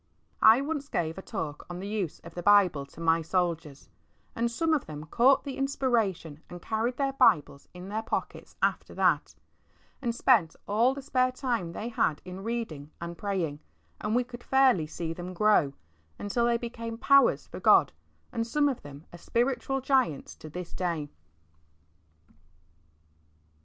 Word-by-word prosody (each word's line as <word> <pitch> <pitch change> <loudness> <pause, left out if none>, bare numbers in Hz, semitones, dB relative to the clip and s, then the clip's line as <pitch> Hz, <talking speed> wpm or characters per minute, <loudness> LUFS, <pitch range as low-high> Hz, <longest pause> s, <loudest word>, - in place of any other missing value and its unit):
*' - - -40 0.2
I - - -1
once 290 -1 -3
gave 165 +1 -2
a - - -7
talk 160 -9 -6
on 175 0 -6
the 195 - -5
use 205 -6 -3
of 170 - -12
the 175 - -5
Bible 180 -8 +4
to 145 - -16
my 165 0 +2
Soldiers, 165 -4 -2 0.5
and 235 +1 0
some 320 +8 0
of 295 - 0
them 150 -1 -7
caught 255 - +4
the 275 -2 -6
inspiration 225 - -1
and 175 - -8
carried 225 +6 -2
their 275 -1 0
Bibles 150 - +3
in 180 +1 -10
their 215 +2 -2
pockets 225 - -5
after - - 0
that, - - +1 0.7
and 235 -3 -1
spent 225 -11 +3
all 230 +6 +3
the 280 - -7
spare 255 -1 +1
time 235 -10 -2
they 225 +6 -4
had 155 -9 0
in 185 +1 -8
reading 220 -11 -4
and 170 0 -6
praying, 175 -7 -2 0.4
and 210 +2 -1
we 250 - +3
could 245 0 -11
fairly 260 -12 +3
see 165 +1 -4
them 180 +2 -7
grow, 210 -8 +3 0.5
until 235 +4 0
they 235 0 +2
became 230 -1 -6
powers 275 +3 +4
for - - -9
God, - - +5 0.4
and 230 0 -2
some 290 +4 +2
of 270 -4 -2
them 145 +2 -11
are 175 - -10
spiritual 255 +5 -1
giants 260 - +1
to 155 - -10
this 175 +2 -7
day. 165 -5 -2
210 Hz, 170 wpm, -28 LUFS, 165-250 Hz, 0.7 s, God